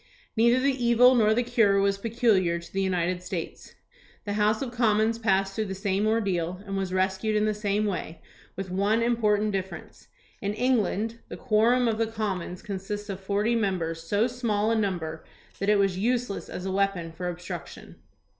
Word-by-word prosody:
Neither 235 +2 +4
the 265 -1 0
evil 240 +2 +6
nor 220 -4 +4
the 245 - +2
cure 225 -5 +3
was 200 0 +1
peculiar 215 -6 +2
to 170 - -11
the 195 - 0
United 180 -1 0
States. 180 -2 -6 0.5
The 205 - -2
House 215 +3 +1
of 250 - -5
Commons 225 -1 +2
passed 195 -3 +1
through 220 +1 -2
the 190 -1 -5
same 195 +1 0
ordeal 185 -6 0
and 195 -1 -4
was 190 -1 -2
rescued 190 +3 0
in 210 0 +2
the 215 - +1
same 210 0 -1
way, 180 -5 -4 0.4
with 190 -1 -5
one 205 +5 +1
important 215 -3 +2
difference. 190 -1 -6 0.3
In 205 0 -2
England 230 -2 0
the - - -8
quorum 240 +2 +3
of 225 -1 0
the 225 - +1
Commons 200 -5 -4
consists 205 +1 -5
of 195 -1 -4
forty 205 +4 0
members, 180 -7 -1
so 205 +7 +1
small 230 -4 0
a - - +2
number 175 -7 -2 0.4
that 200 - 0
it 210 - +5
was 195 -2 +1
useless 235 -1 -1
as 180 - -6
a 190 - -2
weapon 195 -4 0
for 180 +2 -4
obstruc 175 +1 -7
tion. - - -13
205 Hz, 185 wpm, -26 LUFS, 190-225 Hz, 0.5 s, evil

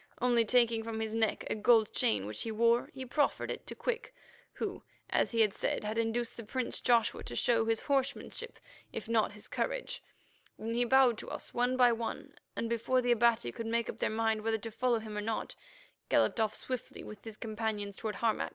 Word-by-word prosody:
Only, 240 -1 +4
taking 235 -1 +4
from 225 0 -4
his 220 -1 -2
neck 225 -1 0
a - - 0
gold 220 0 +4
chain 100 -2 +1
which 105 +1 -4
he 225 - -2
wore, 235 +2 +3
he 265 -1 -7
proffered 285 +3 0
it - - -7
to - - -6
Quick, 475 -1 -3 0.4
who, - - -4 0.3
as - - +2
he 225 -2 +4
said, - - -2
had 215 +2 -1
induced 230 +1 -1
the 230 - -7
prince 250 +3 -3
Joshua 235 -2 +2
to 120 - -5
show 225 - +3
his 225 -1 +1
horsemanship 280 - -2 0.3
if - - -5
not 225 -2 +2
his 210 - -11
courage. - - -2 0.6
Then 225 +1 -4
he 240 +1 +2
bowed 255 -2 +5
to - - -7
us, - - -6
one 245 +1 +1
by 245 -1 +6
one, 230 0 -4 0.2
and 230 - -2
before 235 +3 +1
the 245 - +2
Abati 235 - +3
could 225 - -5
make 230 0 0
up - - -16
their - - +1
mind 220 0 +1
whether 225 +1 +1
to 225 +1 -7
follow 245 +1 +1
him 220 -1 -6
or 210 - -1
not, 220 +1 -3 0.6
galloped - - +3
off 220 -1 +1
swiftly 255 -2 -5
with 210 -1 -10
his 220 -2 -8
companions 215 -2 -3
toward 215 -1 -4
Harmac. 225 +1 0
230 Hz, 205 wpm, -32 LUFS, 220-245 Hz, 0.6 s, by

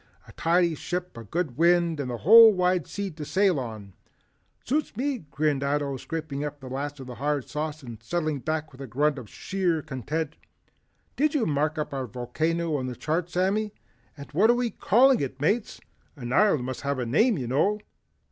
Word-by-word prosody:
"A - - -12
tidy 170 0 +2
ship, 180 +2 -4
a 115 - -8
good 145 - -3
wind 170 -2 +3
and 135 -3 -3
the 120 - -3
whole 225 - +9
wide 180 -3 +1
sea 200 -1 -4
to 155 -1 -8
sail 185 0 +2
on." 110 -6 -7 0.7
"Suits 285 -4 -1
me!" 270 0 -1
grinned 150 -2 0
Ato 140 0 0
scraping 150 -1 -5
up 145 0 -5
the 130 -2 -9
last 145 +2 -4
of 130 - -8
the 125 - -8
hard 145 +1 -2
sauce 155 0 -4
and 115 -4 -9
settling 155 -4 -2
back 155 +2 -3
with 130 - -13
a 135 - -6
grunt 145 +4 +1
of 115 -5 -11
sheer 180 -5 -1
content. 150 +4 -4 0.8
"Did 300 +2 +1
you 255 -7 +2
mark 150 +1 0
up 150 -1 -3
our 135 -2 -3
volcano 155 +8 -1
on 130 -2 -3
the 125 - -5
chart 165 +5 -2
Sammy, 200 +4 0 0.4
and 140 - -10
what 195 +9 +4
are 240 - +6
we 240 -1 -1
calling 255 +5 +4
it 135 -1 -4
Mates? 205 - 0 0.4
An 125 -3 -5
island 195 -10 +4
must 130 0 -5
have 140 0 -1
a 125 - -2
name 210 - +3
you 130 - -3
know." 150 - +1
155 Hz, 195 wpm, -26 LUFS, 135-180 Hz, 0.8 s, whole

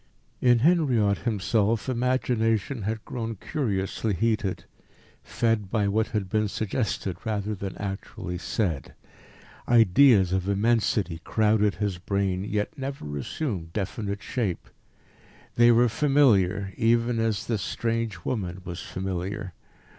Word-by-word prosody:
In 125 -1 +5
Henriot 130 - +3
himself 110 +1 0
imagination 125 -2 0
had 110 +2 -3
grown 115 -2 -4
curiously 105 -3 -2
heated, 110 -1 0 0.6
fed 115 -4 0
by 105 -1 +1
what 110 +2 +1
had 105 -4 -2
been 105 +2 +1
suggested 100 -3 -2
rather 105 -1 -2
than 100 -2 -6
actually 95 -3 -5
said. 85 - -2 0.7
Ideas 115 -3 +5
of 95 +1 0
immensity 100 -4 +1
crowded 105 -2 +2
his 100 -4 -2
brain, 95 -1 -1
yet 105 0 -2
never 135 - -5
assumed 85 - -4
definite 100 0 -3
shape. 105 -9 -3 0.8
They 120 0 +6
were 120 +1 +5
familiar, 105 -9 +3
even 115 +1 +2
as 110 -2 0
this 110 -4 -1
strange 115 -6 -2
woman 95 -6 -3
was 85 -1 -6
familiar. 95 0 -4
105 Hz, 115 wpm, -26 LUFS, 95-115 Hz, 0.8 s, They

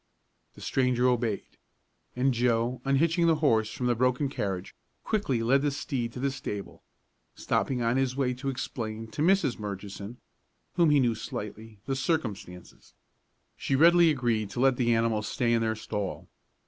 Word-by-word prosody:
The - - -13
stranger 125 -1 +1
obeyed, 120 -4 -1 0.6
and 130 +1 +2
Joe, 120 +1 +1
unhitching 165 +5 +2
the 165 - +4
horse 115 -8 +2
from 125 - -4
the 120 - +3
broken 125 +3 +1
carriage, 95 -7 -4 0.3
quickly 140 - 0
led 135 +4 +3
the 145 - +1
steed 135 -4 -3
to - - -7
the 135 +1 0
stable, 105 -6 -6 0.5
stopping 125 -3 -1
on 115 +2 +1
his 130 -1 0
way 130 -2 0
to 135 +2 -4
explain 115 -4 -5
to 145 - -4
Mrs. 180 - +2
Murchison, 100 +2 -6 0.6
whom 170 -3 +4
he 145 -1 +5
knew 120 -3 +2
slightly, 110 0 -7
the 135 - -1
circumstances. 115 - -4 0.6
She 135 - -1
readily 170 +3 +6
agreed 120 -7 0
to 100 - -6
let 135 0 +4
the 120 -2 +2
animal 115 -1 +1
stay 120 +2 0
in 115 - +2
their 110 -1 0
stall. 105 -3 -5
125 Hz, 160 wpm, -28 LUFS, 110-135 Hz, 0.6 s, readily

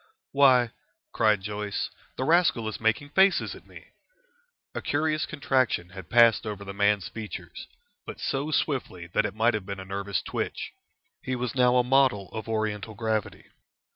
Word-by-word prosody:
"Why!" 130 -4 +5 0.4
cried 110 -3 +2
Joyce, 105 0 -3 0.3
"the 130 - -1
rascal 155 -7 +3
is 110 - -4
making 110 +6 0
faces 190 +5 +3
at - - -14
me." - - -14 0.8
A - - -4
curious 155 +1 0
contraction 130 - 0
had 95 -1 -10
passed 115 -2 +5
over 100 -1 -5
the 100 - -6
man's 100 -1 +2
features, 110 -2 -8 0.4
but - - -7
so 140 +3 -2
swiftly 130 - -1
that - - +2
it 100 - -9
might 115 +2 +3
have 105 -3 -3
been 100 -1 -5
a 95 - -7
nervous 100 -1 -3
twitch. - - -4 0.5
He 130 - -3
was 125 -2 -3
now 125 -1 +4
a 125 - +4
model 125 -7 +2
of 110 0 -7
Oriental 110 -1 -2
gravity. 110 -1 -3
110 Hz, 165 wpm, -27 LUFS, 105-130 Hz, 0.8 s, Why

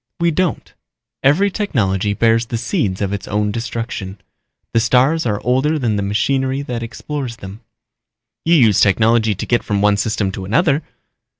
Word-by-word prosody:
We 170 0 +2
don't. 180 +1 -2 0.5
Every 180 +9 +3
technology 105 - 0
bears 115 +2 +2
the 115 - -3
seeds 105 -4 -2
of 100 0 -2
its 100 -2 -5
own 105 0 0
destruction. 115 -4 -5 0.5
The 115 - +4
stars 130 +6 +2
are 105 -2 -1
older 130 +6 +1
than 120 -7 0
the 100 - -1
machinery 130 +7 0
that 120 -4 -4
explores 120 +2 -5
them." 100 -1 -10 0.8
"You 170 +1 +3
used 115 - +4
technology 110 +1 +3
to - - -5
get 120 - +1
from 105 -2 -2
one 105 -1 +3
system 105 -2 -1
to 95 - -6
another." 145 - +2
115 Hz, 165 wpm, -18 LUFS, 105-135 Hz, 0.8 s, The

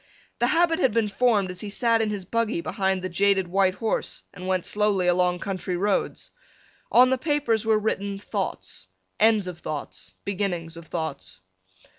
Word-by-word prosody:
The 240 - +3
habit 330 +3 +3
had 255 -4 +2
been 225 -2 +2
formed 205 -3 +2
as 180 - -6
he 210 - -5
sat 230 +2 +2
in 220 - 0
his 205 -3 -4
buggy 230 -4 0
behind 190 -1 -1
the - - -1
jaded 195 +1 +2
white 190 +1 +2
horse 225 0 -2
and 180 +1 -8
went 185 -2 0
slowly 205 -3 +2
along 180 0 +2
country 185 -2 -3
roads. 200 +2 -1 0.6
On 255 +1 +6
the 260 - +1
papers 270 -7 0
were 220 -1 +4
written 200 -2 -2
thoughts, 200 - -4 0.3
ends 220 -2 +4
of 180 -2 -7
thoughts, 150 -4 -6
beginnings 180 -5 -2
of 165 -1 -11
thoughts. 95 - -4
200 Hz, 170 wpm, -25 LUFS, 180-225 Hz, 0.6 s, On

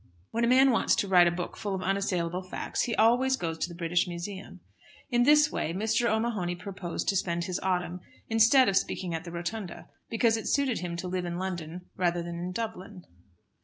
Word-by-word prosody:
When 230 - -1
a - - +3
man 260 +2 +6
wants 230 - +3
to 200 - -1
write 180 -2 +6
a - - +5
book 175 +1 -4
full 205 -2 -3
of 185 - -4
unassailable 185 -2 -1
facts, 185 - -4
he 235 - -2
always 250 +4 +3
goes 165 -5 -4
to - - -1
the 170 - -9
British 175 +1 +1
Museum. 180 +3 -7 0.5
In 240 0 +3
this 295 +3 +5
way 165 - -2
Mr. 220 +4 +1
O'Mahony 215 -5 -1
purposed 185 -1 -5
to 200 - +1
spend 170 -2 0
his 180 0 -3
autumn 180 -1 -1 0.3
instead 225 +4 +5
of 195 - +1
speaking 180 -2 -1
at 165 +2 -4
the 170 - -7
Rotunda, 175 +2 -6 0.2
because 225 0 +2
it 225 - -5
suited 275 -4 +1
him 175 -1 -4
to 180 - -4
live 180 0 -2
in 175 0 -4
London 175 -2 -4
rather 175 -1 0
than 170 0 -6
in 180 +1 -4
Dublin. 205 -3 -6
185 Hz, 205 wpm, -28 LUFS, 175-225 Hz, 0.5 s, man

